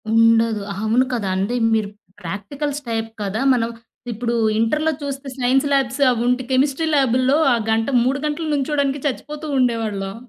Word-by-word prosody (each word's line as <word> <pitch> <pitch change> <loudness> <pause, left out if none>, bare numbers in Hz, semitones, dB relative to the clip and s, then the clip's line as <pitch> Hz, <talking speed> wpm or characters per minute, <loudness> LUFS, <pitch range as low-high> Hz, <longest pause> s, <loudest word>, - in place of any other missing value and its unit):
ఉండదు. 230 -1 +4
అవును. 220 +5 +1
కదా! 205 -6 -1
అంటే 205 +6 -1 0.2
మీరు 215 -2 0 0.3
ప్రాక్టికల్స్ 275 - -4
టైప్ 225 -1 -2
కదా! 200 +4 -2
మనం 230 -2 0 0.4
ఇప్పుడు 235 +2 -2 0.2
ఇంటర్‌లో 305 +8 +1
చూస్తే 280 0 -5
సైన్స్ 260 +2 +2
లాబ్స్, 270 0 0
అవి 240 -2 0
ఉంట్ 250 +1 +2
కెమిస్ట్రీ 275 +4 +1
ల్యాబూ‌ల్‌లో 260 +1 +3 0.2
ఆ - - +3 0.2
గంట 225 0 +1 0.2
3 265 +3 0
గంటలు 300 +2 -2
నిల్చోడానికి 285 -1 0
చచ్చిపోతూ 300 +3 -5
ఉండేవాళ్ళం. 215 -6 -1
250 Hz, 145 wpm, -20 LUFS, 225-280 Hz, 0.4 s, ఉండదు